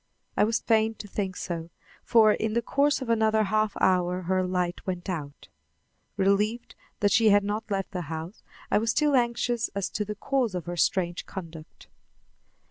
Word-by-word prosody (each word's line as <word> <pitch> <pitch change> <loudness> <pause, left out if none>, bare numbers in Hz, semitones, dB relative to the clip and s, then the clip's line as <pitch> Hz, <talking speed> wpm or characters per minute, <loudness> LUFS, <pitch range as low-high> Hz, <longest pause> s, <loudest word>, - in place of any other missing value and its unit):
I - - +4
was 230 +2 0
fain 220 -1 +2
to 210 - -9
think 190 -2 -3
so, 170 -2 -5 0.3
for 220 -3 +5
in 220 0 -2
the 235 +1 0
course 280 +2 +1
of 245 - -8
another 220 -1 +3
half 215 +1 +1
hour 180 0 +2
her 185 +2 +1
light 180 -1 -2
went 180 -1 -3
out. 150 -6 -5 0.7
Relieved 210 +4 +1 0.3
that 205 -1 +3
she 225 -3 +5
had 205 0 +5
not 210 +2 -3
left 195 -2 -2
the 180 -2 -3
house, 160 +5 -6 0.3
I - - +4
was 225 +1 -1
still 295 +3 +2
anxious 240 -1 +1
as 200 -2 -2
to 210 - -1
the 210 +1 -5
cause 245 -2 -1
of 175 -3 -4
her 175 - -4
strange 175 0 0
conduct. 165 -4 -10
205 Hz, 180 wpm, -27 LUFS, 180-225 Hz, 0.7 s, for